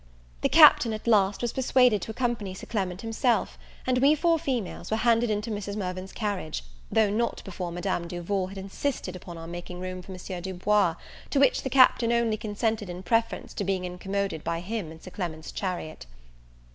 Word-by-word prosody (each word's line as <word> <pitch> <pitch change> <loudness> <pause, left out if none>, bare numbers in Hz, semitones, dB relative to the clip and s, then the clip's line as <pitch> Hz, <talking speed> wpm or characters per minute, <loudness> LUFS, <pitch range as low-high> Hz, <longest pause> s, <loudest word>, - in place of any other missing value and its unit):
The - - +2
Captain, 230 - +7
at 215 - -6
last, 205 -2 +3
was 240 - -1
persuaded 250 -5 +3
to - - -6
accompany 220 -5 -2
Sir - - -8
Clement 190 -4 -2
himself, 230 +2 0 0.3
and 255 -1 +2
we 280 +4 +5
four 330 +1 +2
females 255 - -3
were 220 - +1
handed 230 0 +3
into 210 +2 -1
Mrs. 205 -1 -4
Mirvan's 185 -1 -4
carriage, 195 - -3 0.3
though 215 -2 +3
not 235 +3 -1
before 180 -3 -5
Madame 175 0 -2
Duval 180 +2 -2
had 195 +1 -10
insisted 195 +1 -3
upon 175 -1 -9
our 165 - -8
making 175 +1 -7
room 185 0 -5
for 185 - -11
Monsieur 185 -1 -6
Du 190 +1 -5
Bois, 195 -2 +2 0.3
to 280 - +1
which 275 -2 +4
the 265 - -3
Captain 250 -2 +5
only 235 -2 +2
consented 215 -1 -2
in 180 +1 -6
preference 230 +3 0
to 205 - -3
being 190 -1 -1
incommoded 190 -1 -3
by 165 - -1
him 190 -2 -4
in 160 - -11
Sir 185 - -11
Clement's 160 -5 -5
chariot. 175 - -4
200 Hz, 190 wpm, -27 LUFS, 180-230 Hz, 0.3 s, Captain